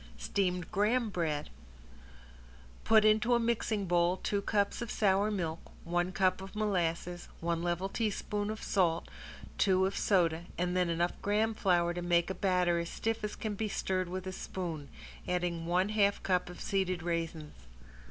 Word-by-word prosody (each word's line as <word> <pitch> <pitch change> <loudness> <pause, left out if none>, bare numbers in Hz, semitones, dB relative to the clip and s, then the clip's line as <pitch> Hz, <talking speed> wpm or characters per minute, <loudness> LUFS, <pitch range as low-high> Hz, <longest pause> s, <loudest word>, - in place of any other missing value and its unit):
~STEAMED 180 - -1
GRAHAM 215 +3 +2
BREAD~ 155 -5 -2 1.3
Put 220 -1 +5
into 215 +3 +4
a - - +3
mixing 230 -3 0
bowl 175 +1 +2
two 200 +1 -1
cups 200 +1 0
of 235 - -4
sour 200 0 +2
milk, 170 -6 -2 0.2
one 175 +1 0
cup 185 0 +1
of 195 +2 -9
molasses, 175 -4 -1
one 170 0 -1
level 175 +2 -1
teaspoon 210 -1 -2
of 215 0 -5
salt, 170 -4 +1 0.5
two 190 -1 +4
of 195 +1 -1
soda 170 -4 +2
and 180 +1 0
then 180 -1 +2
enough 170 +1 +1
graham 215 +2 +1
flour 175 -4 +2
to 175 - -4
make 175 +1 +2
a - - -1
batter 180 -3 +2
as 170 0 -3
stiff 225 -1 -2
as 210 - -3
can 215 -2 -3
be 215 +2 -2
stirred 185 -2 -1
with 185 +1 -4
a 190 - -3
spoon, 170 -6 -5 0.4
adding 175 -2 -1
one 180 +3 +2
half 205 -2 +2
cup 180 -2 +1
of 180 - -10
seeded 185 -3 -1
raisins. 165 -3 -3
185 Hz, 165 wpm, -32 LUFS, 175-205 Hz, 1.3 s, Put